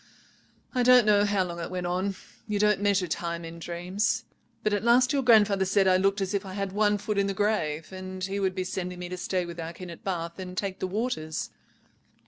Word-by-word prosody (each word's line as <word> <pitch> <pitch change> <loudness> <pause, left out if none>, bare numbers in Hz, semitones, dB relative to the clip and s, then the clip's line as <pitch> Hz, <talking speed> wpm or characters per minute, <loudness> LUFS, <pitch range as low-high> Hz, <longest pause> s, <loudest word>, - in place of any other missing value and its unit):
I 250 - +1
don't 250 -1 +7
know 205 -1 +5
how 200 -2 +2
long 170 -1 -6
it 170 - -4
went 180 -1 -3
on—you 195 +3 -3
don't 210 -1 +3
measure 200 -2 +2
time 170 +1 -3
in 165 +1 -8
dreams—but 180 +4 -3
at 205 - 0
last 250 +3 +4
your 280 - +2
grandfather 210 -5 +5
said 190 +1 +3
I 185 0 +5
looked 195 +2 +1
as 195 +1 -1
if 200 - 0
I 190 -1 -8
had 195 -1 -3
one 210 +1 +2
foot 205 0 -2
in 200 - +2
the 195 - -2
grave, 165 -7 -1
and 185 0 -7
he 195 +2 -2
would 190 -2 0
be 185 - -1
sending 180 -1 -4
me 180 0 -6
to 180 - -5
stay 180 0 -1
with 170 0 -8
our 165 0 -5
kin 180 0 -8
at 170 - -11
Bath 170 -2 -3
and 185 -1 -7
take 195 -1 -2
the 185 - -1
waters. 185 -6 -3
190 Hz, 225 wpm, -27 LUFS, 180-205 Hz, -, don't